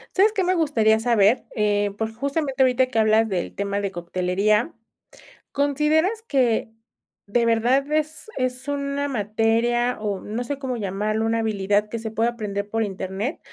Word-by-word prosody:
¿Sabes 410 +3 +5
que 400 -3 0
me 365 +1 +2
gustaría 230 -10 +2
saber?, 230 -1 +3
eh, 205 -1 +1
por 220 0 -3
justamente 275 +2 -2
ahorita 260 0 +4
que 255 -3 -1
hablas 220 +1 +4
del 185 -3 -3
tema 200 0 -2
de 200 - -2
coctelería, 185 +5 0 0.8
¿consideras 300 +9 +1
que 245 - +1 0.6
de 235 +3 +1
verdad 245 +5 +2
es 310 +5 -1
es 255 +1 -2
una 280 0 -2
materia, 230 +1 +1
o 205 -3 -2
no 220 +4 -4
sé 280 +3 -4
cómo 260 -2 -3
llamarlo, 215 +1 -1
una 225 0 +1
habilidad 205 -1 0
que 230 - -5
se 220 -1 -5
pueda 230 +2 +1
aprender 205 -3 -4
por 225 +1 0
internet? 195 - -4
230 Hz, 160 wpm, -23 LUFS, 210-275 Hz, 0.8 s, Sabes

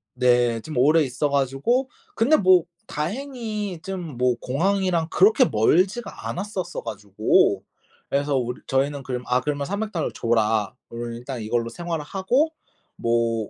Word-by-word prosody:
네 120 -2 +3
좀 155 +3 -7
오래 150 +6 +5
있어 135 +2 -1
가지고 140 - +1 0.3
근데 265 +8 +4
뭐 185 -3 +5 0.2
다행히 215 - -4
쯤 180 -8 -6
뭐 125 0 +2
공항이랑 175 +4 0
그렇게 200 +6 +5
멀지가 185 - +1
않았었어 185 -2 -4
가지고 105 -1 +1 0.5
그래서 140 0 +1
울 125 -1 -3
저희는 140 +1 0
그럼 125 -1 -4
"아 125 +1 +2
그러면 145 +1 -2
300 210 +4 -3
달러를 165 -5 -2
줘라." 110 -3 +1
그러면 120 0 -5
일단 125 0 -6
이걸로 115 +2 -1
생활을 170 -1 -4
하고 250 - +1 0.4
뭐 115 -2 0
145 Hz, 295 characters per minute, -24 LUFS, 120-190 Hz, 0.5 s, 오래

